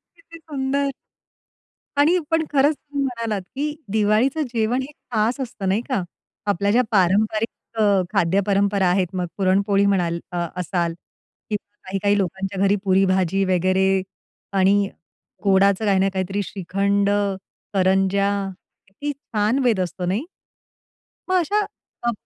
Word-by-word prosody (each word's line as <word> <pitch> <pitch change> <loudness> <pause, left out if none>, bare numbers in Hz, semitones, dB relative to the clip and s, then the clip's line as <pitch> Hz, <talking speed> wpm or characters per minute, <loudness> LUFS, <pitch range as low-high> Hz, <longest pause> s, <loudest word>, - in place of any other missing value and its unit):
किती 335 0 -14
सुंदर! 280 -1 -1 1.1
आणि 315 +6 +5
पण 325 0 +3
खरंच 290 +2 +4
तुम्ही 285 -1 -4
म्हणालात 230 -5 -2
की 295 +2 -2 0.2
दिवाळीचं 220 +8 +2
जेवण 230 +3 +1
हे 270 - -7 0.2
खास 225 +4 +1
असतं, 230 -6 -4
नाही 200 +4 +2
का? 250 -7 +1 0.4
आपल्या 200 0 +1
ज्या 245 +3 +4
पारंपरिक 215 +3 +2 0.3
अ, - - +2 0.3
खाद्य 195 -1 +3
परंपरा 200 -1 +2
आहेत, 180 0 +2
मग 180 -1 -1
पुरणपोळी 200 +1 +2
म्हणाल 175 -4 +1
अ, 175 -1 -1
असाल 175 -2 -1 0.6
किंवा 210 0 -5
काही-काही 200 +1 +1
लोकांच्या 190 +1 -2
घरी 200 - +4
पुरी-भाजी 190 -1 +2
वगैरे 185 +1 +2 0.7
आणि 195 +1 +3 0.5
गोडाचं 195 +1 +3
काही 195 -2 +3
ना 195 +1 +3
काहीतरी 190 +1 -1
श्रीखंड, 200 +2 0 0.6
करंज्या 195 +1 +2 0.6
किती 290 +10 -4
छान 225 -1 0
बेत 230 -6 +2
असतो, 180 0 -2
नाही? 200 - -1 1.0
मग 370 - +2
अशा 405 +5 +1 0.5
अ - - +4
200 Hz, 130 wpm, -22 LUFS, 190-235 Hz, 1.1 s, आणि